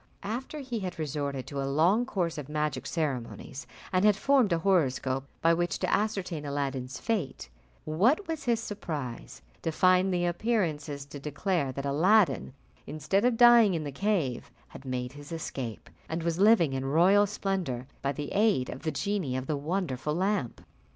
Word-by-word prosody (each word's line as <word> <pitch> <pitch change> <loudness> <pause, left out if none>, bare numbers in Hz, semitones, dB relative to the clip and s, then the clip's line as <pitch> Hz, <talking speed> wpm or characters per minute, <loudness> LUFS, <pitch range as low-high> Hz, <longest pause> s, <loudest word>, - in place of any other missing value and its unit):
After 245 +9 -4
he 250 -4 -4
had 185 -2 -5
resorted 140 -3 -3
to 140 -1 -4
a 135 - -2
long 180 - +3
course 175 -9 -2
of 145 -1 -8
magic 150 -1 -2
ceremonies, 135 -2 -4 0.3
and 185 +1 +3
had 210 -1 +5
formed 260 -2 +3
a 170 - +3
horoscope 135 -7 +1 0.2
by 165 0 +5
which 175 +1 0
to - - -1
ascertain 195 -7 -1
Aladdin's 140 -2 -3
fate, 180 - -3 0.4
what 230 - +2
was 320 -3 -4
his 235 -2 +2
surprise 150 - -6 0.2
to 165 - -1
find 185 +3 +4
the 175 -1 +1
appearances 165 -8 -1
to 145 0 -9
declare 150 +1 -1
that 140 +2 -5
Aladdin, 160 -1 +3 0.3
instead 155 +7 0
of 245 -2 +2
dying 235 -5 +7
in 160 - -2
the 145 - -4
cave, 140 - -1 0.2
had 135 - -12
made 125 -1 -3
his 145 +2 -12
escape, 135 -8 -5 0.2
and 160 +1 -3
was 170 +1 -1
living 200 -8 +5
in 130 0 -2
royal 180 +9 +4
splendour, 190 -11 -2 0.2
by 140 - 0
the 145 +1 -5
aid 200 -11 +2
of 130 - -8
the 155 - -1
genie 180 -5 -1
of 130 - -4
the 150 - -1
wonderful 150 -2 -2
lamp! 190 - -1
165 Hz, 170 wpm, -29 LUFS, 140-200 Hz, 0.4 s, dying